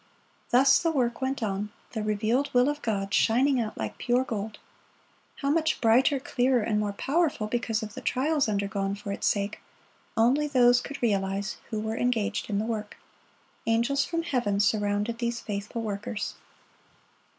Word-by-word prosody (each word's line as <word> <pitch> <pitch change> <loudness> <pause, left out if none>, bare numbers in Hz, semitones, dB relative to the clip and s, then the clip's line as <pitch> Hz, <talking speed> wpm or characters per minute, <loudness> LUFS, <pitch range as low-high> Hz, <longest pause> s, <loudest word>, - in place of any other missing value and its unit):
Thus 265 +3 +6
the 335 - +1
work 245 -6 0
went 265 -2 -1
on, 205 0 -2 0.2
the 220 - -3
revealed 215 +6 0
will 250 +3 +5
of 295 0 -3
God 200 -3 -2
shining 255 +4 +3
out 215 -1 -4
like - - -5
pure 245 +1 +2
gold; 215 -3 -4 0.9
how 280 - +2
much 320 0 +1
brighter, 255 +4 +4
clearer, 250 -2 +1
and 210 -1 0
more 210 -1 -1
powerful 285 0 0
because 225 0 -1
of 210 -1 -7
the - - -7
trials 285 0 +1
undergone 200 -1 -1
for 200 0 -6
its 200 - -1
sake, 200 0 0 0.6
only 260 +7 +3
those 245 -3 +5
could 280 0 -7
realize 195 -2 0
who 215 - -2
were 220 +1 -3
engaged 225 -4 0
in 200 - 0
the 210 - 0
work. 215 -2 -4 0.7
Angels 235 +5 +2
from 335 +3 -2
heaven 240 -10 0
surrounded 205 +2 +1
these 235 -1 -1
faithful 210 +2 -4
workers. 205 0 -4
225 Hz, 160 wpm, -27 LUFS, 210-260 Hz, 0.9 s, Thus